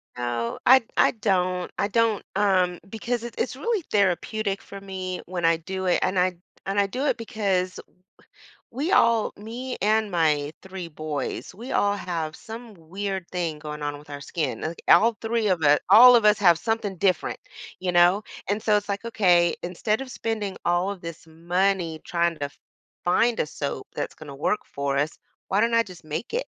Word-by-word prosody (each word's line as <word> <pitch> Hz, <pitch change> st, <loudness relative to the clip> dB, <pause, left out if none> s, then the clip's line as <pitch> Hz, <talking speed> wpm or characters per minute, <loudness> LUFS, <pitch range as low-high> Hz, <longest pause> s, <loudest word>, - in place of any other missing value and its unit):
No. 120 Hz, -1 st, -3 dB
I 260 Hz, 0 st, +7 dB
I -, -, +5 dB
don't. 185 Hz, -4 st, 0 dB
I 200 Hz, -, +1 dB
don't, 225 Hz, -1 st, +1 dB
um, 185 Hz, -3 st, +2 dB
because 235 Hz, +2 st, -3 dB
it's 240 Hz, -, -7 dB
it's 255 Hz, -, -2 dB
really 420 Hz, -, -1 dB
therapeutic 200 Hz, +1 st, 0 dB
for 200 Hz, -, -10 dB
me 185 Hz, -2 st, -5 dB
when 175 Hz, -1 st, -5 dB
I 165 Hz, 0 st, +4 dB
do 185 Hz, +3 st, -5 dB
it, 180 Hz, -, +3 dB
and 185 Hz, -, 0 dB
I 180 Hz, -1 st, +2 dB, 0.3 s
and 195 Hz, +1 st, 0 dB
I 200 Hz, -, +3 dB
do 260 Hz, +7 st, -3 dB
it -, -, +1 dB
because 195 Hz, -5 st, -1 dB, 0.9 s
we 290 Hz, +10 st, -2 dB
all 230 Hz, -, +4 dB
me 240 Hz, +5 st, -6 dB
and 215 Hz, +1 st, +2 dB
my 150 Hz, -4 st, +1 dB
3 190 Hz, -2 st, -7 dB
boys, 155 Hz, +1 st, -4 dB
we 240 Hz, +5 st, -8 dB
all 205 Hz, 0 st, +2 dB
have 165 Hz, -5 st, -4 dB
some 225 Hz, 0 st, -9 dB
weird 190 Hz, +2 st, -5 dB
thing 170 Hz, -4 st, -2 dB
going 150 Hz, 0 st, -7 dB
on 145 Hz, 0 st, -3 dB
with 150 Hz, +1 st, -16 dB
our 145 Hz, 0 st, -6 dB
skin. 140 Hz, -6 st, -3 dB
Like, 165 Hz, +2 st, -5 dB
all 230 Hz, +2 st, +6 dB
3 225 Hz, -1 st, 0 dB
of 180 Hz, -4 st, +1 dB
us 145 Hz, 0 st, +5 dB
all 245 Hz, +5 st, +10 dB
of 230 Hz, -3 st, +4 dB
us 210 Hz, 0 st, +6 dB
have 175 Hz, -4 st, +6 dB
something 205 Hz, -1 st, -2 dB
different. 185 Hz, -3 st, 0 dB, 0.4 s
You 180 Hz, -1 st, -1 dB
know? 175 Hz, +4 st, +5 dB, 0.3 s
And 205 Hz, +1 st, 0 dB
so 215 Hz, -2 st, +3 dB
it's 205 Hz, 0 st, -5 dB
like, 200 Hz, +3 st, -3 dB
okay, 180 Hz, -6 st, +3 dB
instead 210 Hz, +6 st, -1 dB
of 270 Hz, -, -7 dB
spending 215 Hz, -4 st, -3 dB
all 175 Hz, +2 st, +2 dB
of 195 Hz, -, -8 dB
this 165 Hz, -1 st, -8 dB
money 170 Hz, 0 st, -1 dB
trying 170 Hz, -1 st, 0 dB
to 145 Hz, -1 st, -2 dB, 0.6 s
find 230 Hz, +6 st, +2 dB
a -, -, +2 dB
soap 140 Hz, -3 st, -5 dB
that's -, -, -4 dB
gonna 145 Hz, -3 st, -10 dB
work 165 Hz, +9 st, 0 dB
for 140 Hz, -1 st, -2 dB
us, 150 Hz, +4 st, -1 dB, 0.3 s
why 200 Hz, +2 st, +2 dB
don't 230 Hz, 0 st, +2 dB
I 230 Hz, -, +5 dB
just 180 Hz, -5 st, -13 dB
make 155 Hz, -, -5 dB
it? -, -, -1 dB
190 Hz, 190 wpm, -25 LUFS, 170-215 Hz, 0.9 s, all